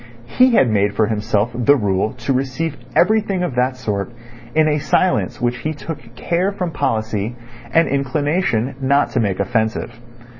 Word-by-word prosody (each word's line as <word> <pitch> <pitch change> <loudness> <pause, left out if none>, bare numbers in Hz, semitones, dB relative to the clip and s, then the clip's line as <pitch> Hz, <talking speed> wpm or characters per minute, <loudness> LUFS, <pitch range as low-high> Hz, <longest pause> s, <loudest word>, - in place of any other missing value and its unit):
He 255 - +3
had 135 - +5
made 105 -2 +1
for 110 - +3
himself 105 +1 0
the 125 +4 +4
rule 105 -3 0
to 135 - -2
receive 135 +4 -2 0.2
everything 200 -2 +2
of 175 - -2
that 125 +1 0
sort 105 -3 -3 0.4
in 155 0 +4
a 150 0 +1
silence 180 +5 +1
which 120 0 0
he 155 +6 -3
took 140 -6 -8
care 175 +9 0
from 180 -4 -3
policy 110 -6 -2 0.4
and 165 +3 +4
inclination 140 -2 0
not 140 +2 +2
to 130 - 0
make 100 -5 0
offensive. 110 +3 -1
130 Hz, 160 wpm, -19 LUFS, 110-155 Hz, 0.4 s, had